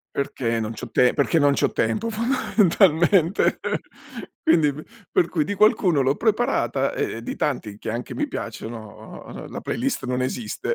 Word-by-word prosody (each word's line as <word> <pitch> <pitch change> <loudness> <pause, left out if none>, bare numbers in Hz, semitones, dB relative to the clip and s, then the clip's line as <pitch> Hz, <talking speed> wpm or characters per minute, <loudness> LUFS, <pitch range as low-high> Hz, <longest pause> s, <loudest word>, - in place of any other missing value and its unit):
Perché 115 -4 -1
non 110 0 -3
c'ho - - -8
te 125 -1 +4
perché 150 +3 +2
non 145 -1 +4
c'ho - - +1
tempo 115 - 0
fondamentalmente. 195 - +3 0.9
Quindi 155 - +4
p 155 +3 -9 0.3
per 170 - +2
cui 160 -4 0
di 205 +7 -2
qualcuno 185 -8 +4
l'ho 135 +2 +2
preparata 220 - 0
e 115 - -3
di - - -5
tanti, 110 -8 -3
che 110 - -5
anche 120 +2 -5
mi - - -2
piacciono, 110 -2 -8
uhm, - - -9
la - - -6
playlist - - -2
non 125 0 -1
esiste, 120 -4 -3
145 Hz, 160 wpm, -23 LUFS, 120-195 Hz, 0.9 s, te